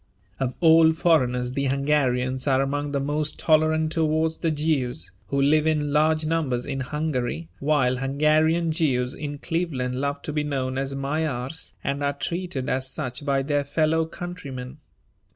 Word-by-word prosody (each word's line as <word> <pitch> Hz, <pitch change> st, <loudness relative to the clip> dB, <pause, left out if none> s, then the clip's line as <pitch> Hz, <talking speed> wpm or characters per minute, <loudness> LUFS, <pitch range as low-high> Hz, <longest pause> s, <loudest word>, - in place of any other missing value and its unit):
Of 130 Hz, -1 st, -1 dB
all 160 Hz, -1 st, +6 dB
foreigners 125 Hz, -7 st, +2 dB
the 140 Hz, +1 st, -1 dB
Hungarians 130 Hz, -2 st, +1 dB
are 135 Hz, -1 st, +3 dB
among 145 Hz, +1 st, -1 dB
the 140 Hz, -, 0 dB
most 145 Hz, +2 st, -1 dB
tolerant 155 Hz, 0 st, +2 dB
towards 160 Hz, 0 st, +1 dB
the 165 Hz, -, +1 dB
Jews, 135 Hz, -, -1 dB, 0.2 s
who 140 Hz, -, -1 dB
live 150 Hz, +3 st, +3 dB
in 150 Hz, -2 st, +1 dB
large 155 Hz, +1 st, +3 dB
numbers 150 Hz, -7 st, 0 dB
in 135 Hz, -1 st, -3 dB
Hungary, 130 Hz, -, -2 dB
while 135 Hz, -3 st, +2 dB
Hungarian 155 Hz, +5 st, +2 dB
Jews 130 Hz, -6 st, 0 dB
in 145 Hz, -1 st, -5 dB
Cleveland 140 Hz, -6 st, -2 dB
love 140 Hz, 0 st, -2 dB
to 150 Hz, -, -4 dB
be 150 Hz, 0 st, 0 dB
known 135 Hz, -3 st, -2 dB
as 135 Hz, 0 st, -3 dB
Magyars 140 Hz, 0 st, -3 dB
and 140 Hz, +1 st, -2 dB
are 140 Hz, 0 st, +1 dB
treated 170 Hz, -3 st, -3 dB
as 130 Hz, 0 st, -1 dB
such 130 Hz, -1 st, -5 dB
by 135 Hz, -1 st, +1 dB
their 145 Hz, 0 st, 0 dB
fellow 160 Hz, +2 st, +1 dB
countrymen. 145 Hz, -7 st, -7 dB
145 Hz, 155 wpm, -24 LUFS, 130-155 Hz, 0.2 s, all